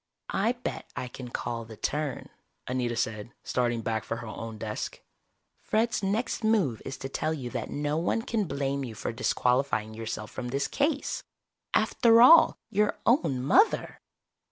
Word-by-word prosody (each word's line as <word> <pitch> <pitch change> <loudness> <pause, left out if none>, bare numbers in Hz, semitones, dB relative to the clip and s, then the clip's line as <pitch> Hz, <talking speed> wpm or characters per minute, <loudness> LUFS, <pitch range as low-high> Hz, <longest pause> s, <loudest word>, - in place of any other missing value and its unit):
"I 220 +5 +2
bet 245 - -6
I 125 - -3
can 125 0 -8
call 120 -1 -3
the 110 -1 -11
turn," 145 +3 -2 0.4
Anita 125 -2 -1
said, 110 0 -3
starting 120 -2 0
back 110 -1 -1
for 115 - -4
her 115 - -7
own 110 0 -6
desk. 105 -1 -4 0.6
"Fred's 225 +1 +1
next 215 +4 -1
move 200 - +2
is 135 - -5
to - - -5
tell 155 +3 -1
you 125 -5 -6
that - - -4
no 145 +1 -1
one 175 +7 0
can 225 -3 0
blame 140 -3 -2
you 115 -4 -6
for - - -3
disqualifying 125 -1 +1
yourself 110 -1 -5
from 125 - -5
this 140 +3 -1
case. 290 0 0 0.5
After 230 -1 +5
all, 320 +8 +8
your 210 0 +2
own 155 - +2
mother!" 400 - +3
135 Hz, 160 wpm, -28 LUFS, -, 0.6 s, all